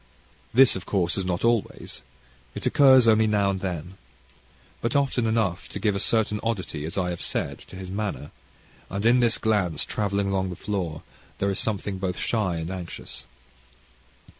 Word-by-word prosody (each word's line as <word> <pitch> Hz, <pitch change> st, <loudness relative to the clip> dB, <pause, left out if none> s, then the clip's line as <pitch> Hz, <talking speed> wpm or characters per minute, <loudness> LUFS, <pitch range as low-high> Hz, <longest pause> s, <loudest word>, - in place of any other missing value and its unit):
This, 130 Hz, +2 st, +6 dB
of 95 Hz, -1 st, -6 dB
course, 90 Hz, -4 st, +1 dB
is 95 Hz, -, -1 dB
not 90 Hz, +3 st, -1 dB
always. 115 Hz, -3 st, -1 dB, 0.5 s
It -, -, -4 dB
occurs 130 Hz, -3 st, +6 dB
now 105 Hz, -3 st, +4 dB
and 95 Hz, -, -3 dB
then. 90 Hz, 0 st, -5 dB, 0.8 s
But 115 Hz, +2 st, -1 dB
often 135 Hz, -4 st, +2 dB
enough 110 Hz, -6 st, 0 dB
to -, -, -6 dB
give 105 Hz, -3 st, +1 dB
a -, -, -1 dB
certain 105 Hz, 0 st, +1 dB
oddity, 95 Hz, -9 st, -3 dB
as 80 Hz, -, -6 dB
I 90 Hz, -2 st, 0 dB
have 85 Hz, -, -5 dB
said, -, -, -2 dB
to -, -, -11 dB
his 95 Hz, 0 st, -7 dB
manner, 100 Hz, -7 st, -4 dB, 0.6 s
and 100 Hz, +3 st, -3 dB
in 120 Hz, +2 st, +5 dB
this 120 Hz, -2 st, +3 dB
glance 95 Hz, -8 st, 0 dB
travelling 100 Hz, -1 st, -1 dB
along 95 Hz, -1 st, 0 dB
the 90 Hz, -, -5 dB
floor 90 Hz, -5 st, -3 dB, 0.3 s
there 100 Hz, 0 st, 0 dB
is 95 Hz, -, -1 dB
something 100 Hz, -2 st, -2 dB
both 95 Hz, -1 st, -2 dB
shy 105 Hz, -7 st, 0 dB
and 80 Hz, +2 st, -4 dB
anxious. 90 Hz, -2 st, -7 dB
100 Hz, 170 wpm, -25 LUFS, 90-110 Hz, 0.8 s, This